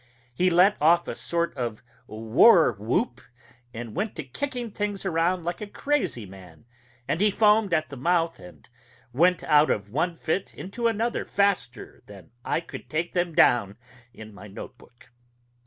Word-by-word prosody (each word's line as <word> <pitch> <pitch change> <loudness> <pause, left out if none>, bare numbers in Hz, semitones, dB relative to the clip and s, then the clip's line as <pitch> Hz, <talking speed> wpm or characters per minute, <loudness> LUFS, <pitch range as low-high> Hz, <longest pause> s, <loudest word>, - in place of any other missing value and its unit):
He 180 +8 +2
let 180 +4 +4
off 170 +3 +4
a - - -3
sort 170 0 -2
of 120 -5 -4 0.2
war 115 - +5
whoop, 110 +3 -2 0.5
and 115 -1 -8
went 200 +4 -3
to 160 - -5
kicking 245 - -5
things 205 -1 -4
around 175 0 0
like 175 +3 -4
a 210 - -5
crazy 195 - -2
man; 95 0 -15 0.4
and 165 - -1
he 210 - +4
foamed 210 -1 +3
at 155 -2 0
the 140 - -9
mouth 165 - 0
and 90 -1 -15 0.5
went 175 +6 +3
out 150 0 +4
of 100 0 -2
one 165 +7 -1
fit 170 +4 -3
into 230 +6 -3
another 230 +1 -1
faster 200 - -1
than 100 -3 -14
I - - -1
could 165 - -11
take 165 +2 -2
them 175 -2 -1
down 100 -5 +3 0.3
in 110 -2 -12
my 100 +1 -12
note 105 +5 -10
book.... 125 +1 -21
165 Hz, 165 wpm, -25 LUFS, 120-195 Hz, 0.5 s, war